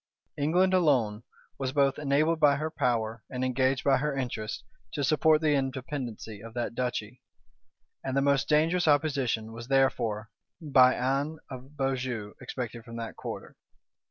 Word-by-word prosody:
England, 180 +6 +2
alone, 130 - +2 0.4
was 130 -1 -2
both 140 -1 +2
enabled 150 +3 +2
by 145 -2 +5
her 155 +3 -3
power, 115 -5 -1
and 130 0 -2
engaged 130 +1 +1
by 135 -1 +4
her 145 +1 -1
interests, 115 -4 -3 0.3
to 145 - -2
support 155 +2 +4
the 155 -2 +3
independency 130 -5 -3
of 115 +1 -11
that 120 -1 -2
duchy; 125 -1 -3 0.8
and 135 0 -2
the - - +5
most 140 -1 +2
dangerous 160 +3 +3
opposition 140 -7 +1
was 115 +1 -8
therefore, 115 -5 +1 0.3
by 130 -5 +5
Anne 140 +5 -1
of 130 +3 -10
Beaujeu, 125 -6 -2
expected 120 -2 -5
from 115 0 -10
that 115 -1 -5
quarter. - - -7
135 Hz, 150 wpm, -28 LUFS, 120-145 Hz, 0.8 s, by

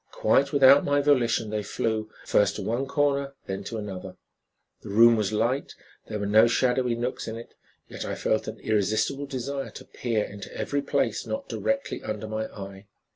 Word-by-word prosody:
Quite 140 +1 +2
without 140 0 +7
my 145 0 +2
volition 120 -6 +2
they 105 -1 -1
flew, 110 +1 -2 0.2
first 100 -1 +3
to 105 - -4
one 120 +7 -1
corner, 140 -1 0
then 95 +1 -4
to 115 - -4
another. 95 -3 -6 0.7
The - - -10
room 115 +3 +6
was 105 -2 0
light, 115 +6 -1 0.3
there 105 - -4
were 100 - -3
no 110 +3 +6
shadowy 125 0 +1
nooks 120 +2 -3
in 110 - -4
it, 115 - -11 0.3
yet - - -7
I - - -3
felt - - 0
an - - -6
irresistible 110 +7 0
desire 135 +1 -4
to - - -11
peer 115 -4 -1
into 100 -1 -8
every 145 0 -1
place 140 0 -1
not 275 0 -4
directly 275 0 -2
under 110 0 -4
my 110 0 -3
eye. 100 -1 -10
115 Hz, 180 wpm, -26 LUFS, 105-140 Hz, 0.7 s, without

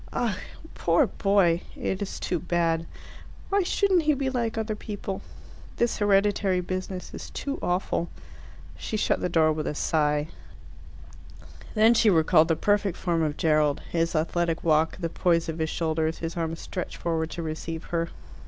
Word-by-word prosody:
"Ugh! 225 -5 0 0.4
Poor 170 0 +3
boy! 190 -4 +2
It 190 - -3
is 200 - -4
too 175 - -1
bad. 165 0 0 0.6
Why 400 0 +3
shouldn't 375 0 +2
he 305 -1 +2
be 270 -1 -1
like 235 -3 -1
other 220 -1 -1
people? 205 -2 -5 0.5
This 235 0 +1
hereditary 200 -2 +3
business 185 +1 -4
is - - -7
too 280 0 -4
awful." 180 -1 -1 0.7
She 215 - -3
shut - - +1
the 180 - 0
door 160 -2 +3
with 155 -1 -3
a 150 - -2
sigh. 150 -1 +1 1.5
Then 220 +2 +6
she 220 -1 +4
recalled 160 -2 +5
the 165 - +2
perfect 205 0 +1
form 170 -3 0
of 150 -2 -1
Gerald, 150 -2 +2
his 165 0 0
athletic 165 +1 0
walk, 160 0 +2
the 170 - -2
poise 170 0 +1
of 160 0 -4
his 160 0 0
shoulders, 160 0 -1
his 165 0 -4
arms 165 -1 -2
stretched 180 - -5
forward 160 -1 -1
to 170 - -5
receive 160 +1 -4
her. 165 0 0
170 Hz, 160 wpm, -26 LUFS, 160-205 Hz, 1.5 s, Then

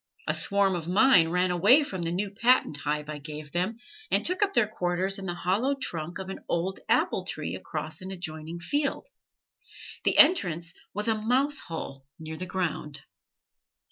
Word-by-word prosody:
A - - +2
swarm 200 -1 +1
of 170 -2 -4
mine 185 -2 +5
ran 180 +1 +1
away 205 - +6
from 190 -10 -5
the 165 0 -2
new 195 +3 -1
patent 230 - +3
hive 150 +1 -2
I 150 -1 -5
gave 150 0 -8
them, 185 +6 -1 0.3
and 200 +2 +2
took 365 +3 -1
up 400 -1 +2
their 215 - +4
quarters 190 -1 -1
in 190 - -6
the 175 - -3
hollow 210 +11 +1
trunk 175 - -4
of 190 -1 -6
an 195 - -6
old 180 +3 -1
apple - - +2
tree - - -4
across 155 +1 -5
an 185 - -6
adjoining 160 -3 -5
field. 285 - -1 1.0
The - - +2
entrance 170 - +4 0.2
was 210 +3 -3
a 225 - +4
mouse 255 +7 +1
hole 135 -5 -7
near 160 0 -7
the 185 +3 -5
ground. 150 -6 -3
180 Hz, 175 wpm, -27 LUFS, 160-215 Hz, 1.0 s, away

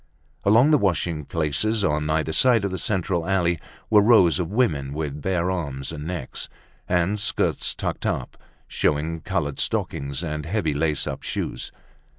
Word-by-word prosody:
Along 115 +9 +5
the 150 - +5
washing 85 -5 0
places, 85 +9 0
on 75 0 0
either 80 0 0
side 120 -2 +4
of 100 - -2
the 95 - -3
central 90 -3 0
alley, 90 -3 +1 0.3
were 105 -1 +7
rows 100 -6 +5
of 85 - -2
women, 75 - 0
with 75 -2 -4
bare 90 0 0
arms 70 -7 -3
and 75 -1 -6
necks, 90 -1 -5 0.4
and 90 +4 +1
skirts 105 - +1
tucked - - -3
up, - - -3 0.3
showing 80 +3 0
colored 80 -7 -2
stockings 70 +3 -1
and 75 -2 -3
heavy 90 -5 0
lace 75 0 0
up - - -4
shoes. - - -4
85 Hz, 160 wpm, -24 LUFS, 75-100 Hz, 0.4 s, were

